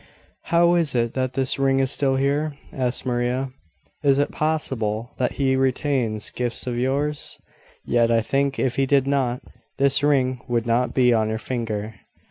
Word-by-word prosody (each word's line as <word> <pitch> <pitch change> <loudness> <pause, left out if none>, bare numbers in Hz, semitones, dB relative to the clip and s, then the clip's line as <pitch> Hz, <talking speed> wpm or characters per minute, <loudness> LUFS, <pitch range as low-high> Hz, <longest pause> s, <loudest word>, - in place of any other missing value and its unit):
"How 170 +1 +3
is 165 -7 +1
it 115 -1 0
that 130 -1 -2
this 135 +1 +1
ring 135 0 +2
is 135 -1 +1
still 135 -2 +2
here?" 140 +2 0 0.2
asked 125 -1 -1
Maria. 125 +1 -1 0.5
"Is 140 -1 +3
it 145 - +1
possible 120 -8 -2
that 125 - 0
he 135 -1 +1
retains 130 -4 0
gifts 120 -2 -1
of 125 -1 -3
yours? 140 +4 -1 0.5
Yet, 120 -1 +2
I 115 -1 +2
think, 140 +2 0
if 125 -2 -1
he 135 0 +2
did 135 -1 +3
not, 135 -3 0 0.3
this 140 -1 +4
ring 130 -4 +1
would 120 -2 0
not 120 +2 0
be 125 -2 +4
on 110 -1 +1
your 110 - -2
finger." 110 -2 -4
130 Hz, 170 wpm, -23 LUFS, 120-140 Hz, 0.5 s, this